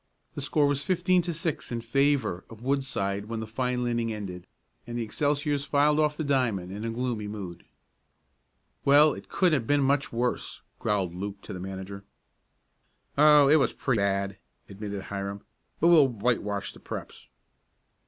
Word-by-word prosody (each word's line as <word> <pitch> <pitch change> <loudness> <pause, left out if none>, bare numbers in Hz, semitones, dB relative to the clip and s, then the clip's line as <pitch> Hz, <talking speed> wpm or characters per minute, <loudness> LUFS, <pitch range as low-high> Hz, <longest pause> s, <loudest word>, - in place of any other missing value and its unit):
The - - -5
score 145 +1 +2
was 140 0 +1
fifteen 185 0 +2
to 175 0 -3
six 165 -4 -3
in 120 - -2
favor 125 -5 +1
of 115 0 -12
Woodside 125 -8 -1
when 115 +1 -4
the 110 - -4
final 125 +2 -1
inning 120 -1 0
ended, 95 -5 -6 0.4
and 120 0 -4
the 120 - -1
Excelsiors 145 +4 0
filed 150 +1 +3
off 150 -1 +2
the 155 - -2
diamond 120 -11 0
in 110 +3 -4
gloomy 115 -3 -2
mood. 95 -5 -7 1.2
"Well, 145 +2 +6
it - - -10
couldn't 180 -4 +2
have 110 - -11
been 145 -1 +3
much 140 +1 +1
worse," 120 +1 -2 0.2
growled 95 -4 0
Luke 100 +2 -5
to - - -7
the 90 - -6
manager. 95 +1 -7 1.1
"Oh, 150 -1 +7
it 150 +3 +6
was 145 - +2
pretty 125 -5 0
bad," 100 -1 0 0.3
admitted 100 0 -6
Hiram, 100 0 -5 0.4
"but 170 - +4
we'll 155 -5 +7
whitewash 105 -4 -1
the - - -14
Preps." - - -8
120 Hz, 165 wpm, -27 LUFS, 100-145 Hz, 1.2 s, Oh